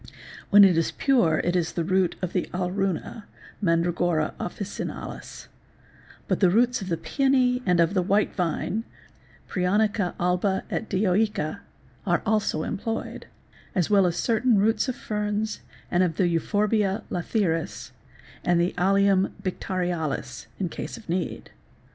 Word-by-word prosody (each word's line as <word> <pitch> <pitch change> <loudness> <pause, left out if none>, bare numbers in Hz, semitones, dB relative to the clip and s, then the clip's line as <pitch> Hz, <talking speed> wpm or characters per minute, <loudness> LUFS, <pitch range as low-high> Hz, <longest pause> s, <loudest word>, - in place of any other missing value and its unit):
When 205 0 +8
it 180 -4 +5
is 165 - 0
pure 235 - +2
it 175 +1 0
is 170 -2 0
the 170 - -1
root 185 +1 +1
of 180 - -2
the 180 - -1
alruna 190 +3 -2 0.4
(mandragora 170 -2 +1
officinalis), 200 +2 -6 0.8
but - - 0
the 185 - +5
roots 240 +5 +2
of 190 - -5
the 165 - 0
peony 250 - +2
and 180 -1 +3
of 170 +2 +3
the 185 - +2
white 200 +4 +1
vine 185 +4 -1 0.6
(pryonica 200 +1 +1
alba 180 +2 +1
et 220 - -3
dioica) 200 -3 0 0.5
are 175 -1 +2
also 210 -7 +1
employed; 225 +3 -4 0.5
as 180 0 +1
well 195 -3 +5
as 170 - -1
certain 230 +3 +2
roots 220 +6 +2
of 255 - -2
ferns 210 0 -2 0.3
and 175 - +3
of 175 -4 +1
the 185 - +2
euphorbia 205 +4 +1
lathyris 175 -2 -1 0.5
and 175 -1 +2
the 175 +2 +1
alliumbictarialis 185 -5 0
in 190 - 0
case - - -6
of 225 - -14
need. 175 0 -3
190 Hz, 135 wpm, -25 LUFS, 175-210 Hz, 0.8 s, When